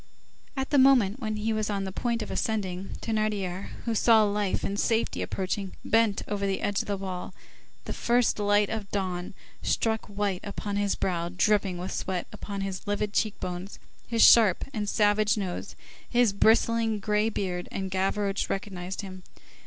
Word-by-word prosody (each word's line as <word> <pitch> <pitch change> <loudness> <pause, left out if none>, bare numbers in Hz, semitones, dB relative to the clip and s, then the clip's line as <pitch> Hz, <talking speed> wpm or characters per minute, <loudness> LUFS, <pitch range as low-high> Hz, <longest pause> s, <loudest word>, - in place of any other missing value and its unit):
At 265 0 -2
the 285 - +5
moment 260 -5 +5
when 215 -4 -2
he 215 +1 -1
was 215 -1 -1
on 200 -1 -1
the 190 - -4
point 235 +3 -1
of - - -8
ascending, 195 -4 -2
Thénardier, 210 -4 -1 0.2
who 230 - 0
saw 225 0 +5
life 205 -2 0
and 200 +1 -2
safety 225 -1 +1
approaching, 190 0 -3
bent 225 -3 +2
over 200 -1 -1
the 195 - -1
edge 205 -1 0
of - - -10
the 200 -1 -1
wall; 185 -2 -6 0.5
the - - -4
first 240 -2 +2
light 205 0 +3
of 215 -3 -4
dawn 185 -3 -3 0.3
struck 220 -1 0
white 200 -2 -1
upon 200 0 -4
his 205 -1 +1
brow 170 -2 -1
dripping 190 0 +1
with 180 +2 -5
sweat, 185 -2 -2
upon 200 -1 -5
his 195 0 -5
livid 205 0 -1
cheek 215 -1 0
bones, 180 +2 -5 0.3
his 230 -1 +3
sharp 215 -6 +7
and 210 -2 -2
savage 210 +1 +3
nose, 185 -4 -4 0.3
his 240 -4 +3
bristling 225 +1 +3
gray 210 +2 +1
beard, 180 -4 -3
and 190 -1 -4
Gavroche 195 +1 0
recognized 190 -2 -4
him. 185 -2 -9
205 Hz, 170 wpm, -27 LUFS, 190-220 Hz, 0.5 s, sharp